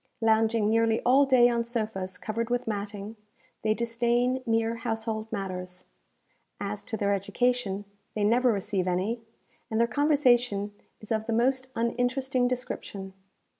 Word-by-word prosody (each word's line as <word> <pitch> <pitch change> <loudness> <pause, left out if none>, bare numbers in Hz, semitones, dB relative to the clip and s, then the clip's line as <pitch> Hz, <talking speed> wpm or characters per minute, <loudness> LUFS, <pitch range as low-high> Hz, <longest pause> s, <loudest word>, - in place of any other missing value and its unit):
Lounging 220 -1 +3
nearly 225 0 +3
all 270 +3 +5
day 250 -2 +6
on 235 -1 +1
sofas 215 -6 -3
covered 225 +4 -3
with 245 0 0
matting, 205 0 -4 0.4
they 215 0 +2
disdain 240 +2 +1
mere 225 0 +1
household 225 -1 -3
matters. 185 -3 -4 0.7
As 200 0 -4
to 220 - -3
their 200 -1 +1
education, 205 0 0 0.3
they 210 - 0
never 240 +4 +4
receive 195 -2 -1
any; 190 +6 0 0.5
and 220 - 0
their 235 - +5
conversation 245 -6 +2 0.3
is 215 - -11
of 220 0 0
the 230 - 0
most 260 +3 +2
uninteresting 245 +2 0
description. 205 -6 -4
225 Hz, 135 wpm, -28 LUFS, 205-245 Hz, 0.7 s, day